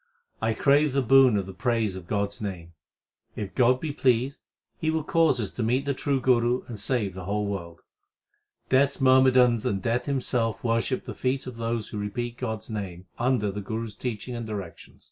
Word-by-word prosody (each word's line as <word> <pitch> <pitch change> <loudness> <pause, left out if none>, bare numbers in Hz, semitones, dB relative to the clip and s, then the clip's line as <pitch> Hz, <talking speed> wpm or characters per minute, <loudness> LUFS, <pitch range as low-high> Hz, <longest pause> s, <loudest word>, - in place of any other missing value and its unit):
I 110 0 +1
crave 145 +2 +3
the 135 -1 +2
boon 130 -2 +6
of 100 - -1
the 95 - -8
praise 110 -1 0
of 90 -2 -9
God 100 0 0
s 100 - -11
name. 90 -5 -6 0.6
If 100 -3 -5
God 125 0 +3
be 155 0 -3
pleased, 130 -1 +1 0.4
He 160 - 0
will 160 -1 0
cause 165 -6 +3
us 105 -4 -2
to - - -5
meet 125 +5 +1
the 140 - 0
true 135 0 0
Guru 125 -1 +2
and 115 -4 -8
save 105 -4 0
the 90 -1 -8
whole 105 +2 -1
world. 85 -4 -5 0.9
Death 140 +1 +3
s - - -14
myrmidons 130 -3 +5
and 100 - 0
Death 120 +6 -1
himself 125 -5 -1
worship 115 +2 0
the - - -6
feet 130 +1 -1
of 125 -2 -8
those 115 -1 -2
Who 105 - -5
repeat 120 +4 -4
God 110 -4 -3
s - - -10
name 95 -4 -5
under 120 -4 +1
the 105 +1 -5
Guru 110 +3 -4
s 110 - -8
teaching 120 +2 -5
and 115 -1 -5
directions. 100 -6 -8
115 Hz, 205 wpm, -26 LUFS, 105-130 Hz, 0.9 s, boon